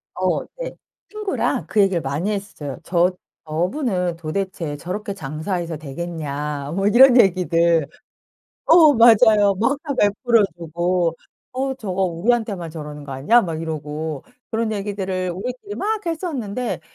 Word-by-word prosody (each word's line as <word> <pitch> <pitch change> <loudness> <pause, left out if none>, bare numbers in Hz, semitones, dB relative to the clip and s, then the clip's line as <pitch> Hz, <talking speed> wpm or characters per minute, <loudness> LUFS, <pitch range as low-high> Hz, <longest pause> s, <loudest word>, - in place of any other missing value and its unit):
어 - - 0 0.2
네. - - -5 0.3
친구랑 425 -2 -2
그 215 - 0
얘기를 190 -4 +2
많이 150 +9 -2
했어요. 160 - -5
"저 175 +1 +2 0.4
저분은 180 - -1
도대체 170 -2 -3
저렇게 195 +6 -5
장사해서 165 +1 -4
되겠냐." 150 -2 -5
뭐 195 +1 +1
이런 250 +3 +7
얘기들 170 -5 +3 0.8
어 320 -4 +7
맞아요. 220 -3 +6
막 230 +9 0
다 285 -4 -3
베풀어 220 +3 +3
주고 170 +1 -1 0.4
"어 265 +1 -2
저거 195 -6 -3
우리한테만 190 -1 -1
저러는 150 -2 -8
거 140 - -7
아니야?" 145 - +4
막 165 -6 -4
이러고 155 -1 -5 0.3
그런 225 -1 -1
얘기들을 190 -3 -3
우리끼리 250 - -6
막 430 +2 -2
했었는데 265 - -3
185 Hz, 290 characters per minute, -21 LUFS, 160-230 Hz, 0.8 s, 이런